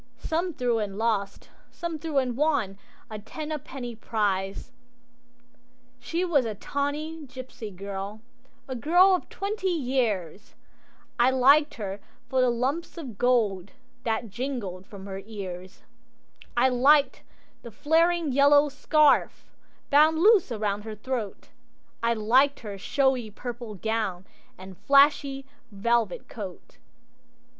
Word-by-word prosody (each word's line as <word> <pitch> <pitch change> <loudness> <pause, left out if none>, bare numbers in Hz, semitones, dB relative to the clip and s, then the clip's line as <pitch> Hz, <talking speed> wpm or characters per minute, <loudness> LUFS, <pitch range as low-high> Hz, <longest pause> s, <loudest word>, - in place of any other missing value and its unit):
Some 340 +7 -2
threw 245 -3 0
and 200 -2 -4
lost, 215 -3 -2 0.2
some 335 -2 -5
threw 305 -1 -3
and 255 -3 +1
won 250 -9 0 0.3
A 215 - -5
ten 300 +9 -7
a 305 - -2
penny 245 -3 -7
prize. 200 -4 -2 1.3
She 335 +9 -2
was 300 -7 +3
a 220 -3 -4
tawny 290 +6 -4
gipsy 255 -3 -8
girl, 200 +2 -6 0.5
A 260 - -4
girl 350 - +4
of 365 - -1
twenty 395 -1 -3
years, 235 - -2 0.6
I 240 +2 +5
liked 275 +4 +4
her 200 -2 -5 0.3
for 260 -1 +2
the 255 - +4
lumps 265 +10 -2
of 255 -11 -8
gold 215 -6 +1 0.3
That 225 -1 -2
jingled 215 -7 -5
from 195 -2 -10
her 195 -1 -6
ears; 190 -4 -8 0.7
I 250 +2 +5
liked 275 +3 +4 0.4
the 235 - -9
flaring 325 +6 +2
yellow 285 +2 +5
scarf 295 +1 +2 0.5
Bound 305 +3 +5
loose 390 - +5
around 210 -2 -1
her 215 0 -7
throat, 220 -2 -5 0.5
I 235 0 +1
liked 255 +6 +3
her 210 -3 -6
showy 265 0 +1
purple 240 0 -7
gown 200 -3 -2 0.3
And 185 0 -11
flashy 275 -1 +3 0.3
velvet 230 +2 0
coat. 195 -7 -9
245 Hz, 125 wpm, -26 LUFS, 210-285 Hz, 1.3 s, I